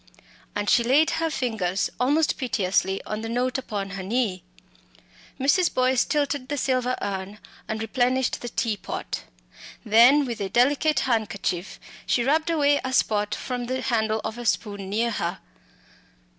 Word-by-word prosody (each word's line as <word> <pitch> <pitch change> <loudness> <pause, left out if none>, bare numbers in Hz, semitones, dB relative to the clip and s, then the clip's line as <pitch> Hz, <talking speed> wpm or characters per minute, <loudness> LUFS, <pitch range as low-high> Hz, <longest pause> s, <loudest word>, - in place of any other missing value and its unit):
And 205 0 -2
she 235 - +4
laid 280 +7 +4
her 325 0 0
fingers 215 - -1
almost 290 +5 +2
piteously 195 -5 0
on 215 0 -4
the 225 - -5
note 250 +3 0
upon 205 -6 -4
her 195 0 -5
knee. 200 -2 -1 1.0
Mrs. 285 +7 +3
Boyce 255 -1 +2
tilted 285 -3 -1
the 290 - -2
silver 255 -2 0
urn 195 +1 -4 0.3
and 220 - -3
replenished 250 +3 0
the 240 - -5
tea 225 -2 -1
pot. - - -5 0.6
Then 240 +7 +6
with 235 -4 -5
a 195 - -2
delicate 285 +8 +3
handkerchief 200 -6 -2 0.3
she 240 - +2
rubbed 315 +5 +1
away 290 -3 +3
a 260 - -3
spot 210 -3 +1
from 250 -2 -4
the 260 +1 -2
handle 220 -2 0
of 220 - -5
a 240 - -6
spoon 195 +1 -1
near 230 +4 0
her. 175 -3 -2
240 Hz, 155 wpm, -25 LUFS, 205-260 Hz, 1.0 s, Then